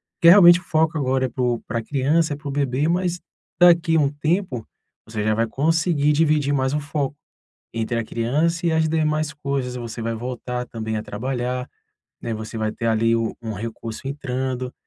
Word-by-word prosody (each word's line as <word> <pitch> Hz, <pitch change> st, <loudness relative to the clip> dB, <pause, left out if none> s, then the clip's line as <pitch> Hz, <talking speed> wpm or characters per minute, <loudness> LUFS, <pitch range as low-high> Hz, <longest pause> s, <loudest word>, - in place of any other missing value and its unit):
porque 170 Hz, -, +6 dB
realmente 175 Hz, -2 st, +8 dB
o -, -, -17 dB
foco 160 Hz, -1 st, +1 dB
agora 130 Hz, -2 st, +1 dB
é 130 Hz, -, -3 dB
pro 120 Hz, -1 st, -1 dB
pra 115 Hz, +1 st, -2 dB
criança 145 Hz, +5 st, +1 dB
e -, -, -3 dB
para 145 Hz, +1 st, -10 dB
o -, -, -2 dB
bebê, 140 Hz, +1 st, 0 dB
mas 175 Hz, 0 st, 0 dB, 0.4 s
daqui 170 Hz, -1 st, +5 dB
há 160 Hz, -, +5 dB
um 140 Hz, -, +3 dB
tempo 150 Hz, -, -2 dB, 0.4 s
você 110 Hz, -2 st, -3 dB
já 110 Hz, 0 st, +1 dB
vai 115 Hz, +1 st, +1 dB
conseguir 155 Hz, +3 st, +1 dB
dividir 150 Hz, -2 st, +2 dB
mais 130 Hz, 0 st, 0 dB
foco 145 Hz, -1 st, -2 dB, 0.6 s
entre 115 Hz, +1 st, -1 dB
a 115 Hz, -, -2 dB
criança 155 Hz, -, 0 dB
e 165 Hz, -, +2 dB
as 160 Hz, 0 st, +2 dB
demais 155 Hz, -1 st, 0 dB
coisas. 140 Hz, -3 st, -3 dB
Você 120 Hz, -1 st, -6 dB
vai 115 Hz, 0 st, -2 dB
voltar 125 Hz, +1 st, -4 dB
também 110 Hz, -1 st, -4 dB
a 105 Hz, -, -3 dB
trabalhar, 125 Hz, +2 st, -3 dB, 0.5 s
né, 115 Hz, -, -3 dB
você 110 Hz, +1 st, -7 dB
vai 110 Hz, -1 st, -1 dB
ter 115 Hz, -, -5 dB
ali 115 Hz, +1 st, +2 dB
u 115 Hz, -1 st, -1 dB
um 110 Hz, -1 st, -4 dB
recurso 115 Hz, +3 st, -6 dB
entrando, 130 Hz, -2 st, -3 dB
135 Hz, 190 wpm, -22 LUFS, 115-155 Hz, 0.6 s, realmente